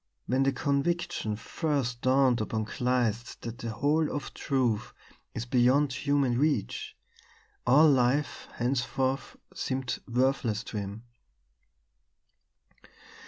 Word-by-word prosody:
When 130 Hz, +2 st, +1 dB
the 135 Hz, 0 st, +3 dB
conviction 140 Hz, -4 st, -1 dB
first 125 Hz, 0 st, -2 dB
dawned 130 Hz, -2 st, +3 dB
upon 110 Hz, 0 st, -2 dB
Kleist 120 Hz, -1 st, -1 dB
that 115 Hz, +1 st, -6 dB
the 115 Hz, -, -4 dB
whole 145 Hz, +7 st, +1 dB
of 145 Hz, -, -5 dB
truth 125 Hz, -7 st, -1 dB, 0.4 s
is 115 Hz, -, -3 dB
beyond 130 Hz, +3 st, +3 dB
human 135 Hz, -3 st, +1 dB
reach, 150 Hz, -, -1 dB, 0.7 s
all 145 Hz, +6 st, +7 dB
life 135 Hz, +1 st, +2 dB
henceforth 130 Hz, +2 st, -1 dB, 0.2 s
seemed 130 Hz, -1 st, -2 dB
worthless 125 Hz, -3 st, +1 dB
to 110 Hz, -, -6 dB
him. 100 Hz, +2 st, -5 dB
130 Hz, 105 wpm, -29 LUFS, 120-140 Hz, 0.7 s, all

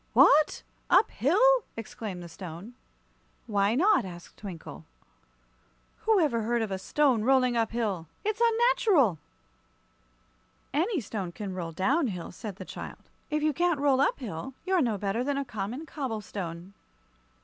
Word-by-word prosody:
"What! 300 Hz, +1 st, +5 dB, 0.3 s
Up 440 Hz, -, +5 dB
hill?" 300 Hz, -, +1 dB, 0.4 s
exclaimed 210 Hz, -5 st, -6 dB
the -, -, -8 dB
Stone. 180 Hz, +5 st, -9 dB, 0.7 s
"Why 205 Hz, -1 st, +1 dB
not?" 385 Hz, +8 st, +4 dB
asked 175 Hz, -2 st, -10 dB
Twinkle. 165 Hz, -, -9 dB, 1.2 s
"Who 440 Hz, -2 st, +4 dB
ever 270 Hz, -9 st, +2 dB
heard 235 Hz, +1 st, 0 dB
of 215 Hz, -, -4 dB
a 190 Hz, -, -2 dB
stone 255 Hz, +2 st, +2 dB
rolling 255 Hz, -1 st, +3 dB
up 225 Hz, -2 st, +1 dB
hill? 205 Hz, -8 st, -2 dB, 0.2 s
It's 430 Hz, +2 st, -1 dB
unnatural!" 450 Hz, -, +3 dB, 1.5 s
"Any 345 Hz, -, +1 dB
stone 200 Hz, -4 st, -4 dB
can 195 Hz, +1 st, -6 dB
roll 170 Hz, -3 st, -4 dB
down 265 Hz, -, +1 dB
hill," 180 Hz, -6 st, -5 dB
said 205 Hz, +1 st, -7 dB
the 185 Hz, -, -9 dB
child. -, -, -9 dB, 0.2 s
"If 300 Hz, -1 st, -1 dB
you 305 Hz, -1 st, +2 dB
can't 345 Hz, 0 st, +1 dB
roll 275 Hz, -2 st, +3 dB
up 280 Hz, -, +2 dB
hill, 240 Hz, -, -6 dB
you're 370 Hz, -2 st, +2 dB
no 230 Hz, -6 st, +1 dB
better 200 Hz, +4 st, -1 dB
than 280 Hz, +1 st, -1 dB
a 280 Hz, -, -2 dB
common 235 Hz, +5 st, -5 dB
cobble 260 Hz, -9 st, -4 dB
stone." 180 Hz, -2 st, -7 dB
230 Hz, 150 wpm, -28 LUFS, 195-295 Hz, 1.5 s, What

